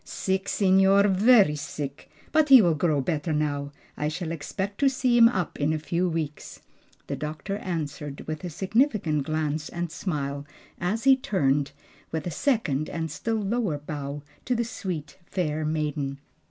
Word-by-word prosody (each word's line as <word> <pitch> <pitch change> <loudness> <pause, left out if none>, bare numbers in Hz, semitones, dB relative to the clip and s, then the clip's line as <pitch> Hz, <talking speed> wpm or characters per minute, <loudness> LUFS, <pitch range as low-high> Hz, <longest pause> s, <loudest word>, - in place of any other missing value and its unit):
"Sick, 190 0 -2
signor, 195 +1 +4
very 200 -4 +5
sick, 145 -1 -6 0.2
but 310 -1 +3
he 265 -2 +11
will 175 -6 +4
grow 155 -2 +1
better 155 +2 -2
now. 145 -2 -1 0.2
I 150 - -1
shall 160 +2 -3
expect 190 +6 -4
to 280 - +5
see 255 -2 +1
him 230 -1 +8
up 185 -8 -3
in 150 +2 +1
a - - 0
few 170 +4 -1
weeks," 160 -3 -4 0.5
the - - -3
doctor 155 +6 -4
answered 150 -6 -4
with 155 +1 -5
a 180 - -3
significant 190 - +1
glance 155 -1 -1
and 175 -1 -4
smile 145 -5 -3 0.4
as 205 +6 -1
he 270 0 +7
turned, 145 - 0 0.4
with 160 -2 -3
a 175 - -3
second 155 - 0
and 160 -2 -3
still 225 +7 -2
lower 205 -6 0
bow, 145 -1 -6 0.2
to 250 - +1
the 235 0 0
sweet, 180 -9 -5
fair 155 -5 -1
maiden. 150 -3 -2
165 Hz, 165 wpm, -26 LUFS, 150-200 Hz, 0.5 s, he